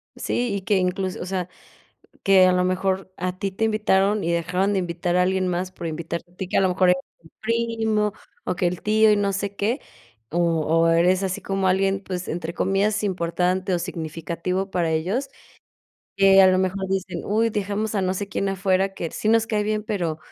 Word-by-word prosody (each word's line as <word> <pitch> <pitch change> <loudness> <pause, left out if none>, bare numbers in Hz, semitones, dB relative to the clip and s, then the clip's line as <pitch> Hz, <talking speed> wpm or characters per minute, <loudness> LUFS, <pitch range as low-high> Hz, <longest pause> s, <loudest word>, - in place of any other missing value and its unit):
Sí, 240 -3 -1
y 200 - -3
que 195 +2 +1
incluso, 185 0 -1
o - - -4
sea, 185 -1 -3 0.8
que 190 -1 +6
a 185 - +4
lo 180 0 +2
mejor 185 +1 -1
a 185 +1 -3
ti 195 0 -2
te 210 +4 -1
invitaron 210 -2 +2
y 170 - 0
dejaron 180 +4 0
de 195 - +1
invitar 175 0 -2
a 180 - +4
alguien 185 0 +1
más 180 +1 -2
por 175 - -7
invitarte 170 +2 -5
a - - -26
ti 185 - -5
que - - -1
a - - +5
lo 190 - +3
mejor 180 0 +3
el 180 - +4 0.4
primo 225 -2 0 0.3
o - - -2
que 175 - +1
el 175 0 -2
tío 215 +1 +4
y - - +3
no 200 -1 +1
sé 200 +1 -3
qué, 225 +8 0 0.5
o 170 - -1 0.3
o 165 +1 +3
eres 175 +3 +3
así 190 -1 -2
como 195 -1 -1
alguien, 195 +1 +1
pues 185 -2 -5
entre 170 0 -4
comillas 200 +3 +1
"importante 180 0 0
o 175 - +2
significativo", 170 +2 -4
para 175 -3 0
ellos, 190 - -1 0.9
que 195 0 +6
a 190 - +8
lo 185 0 +4
mejor 190 +1 -1
dicen: 195 0 -2
"Uy, 225 +3 +1
dejamos 210 +1 -2
a 200 - +1
no 185 0 0
sé 200 +1 -4
quién 195 +1 -2
afuera, 195 0 +1
que 165 -4 -4
sí 215 - -3
nos 225 0 +4
cae 215 -2 0
bien, 215 0 -1
pero 175 -8 -2
190 Hz, 210 wpm, -23 LUFS, 180-200 Hz, 0.9 s, a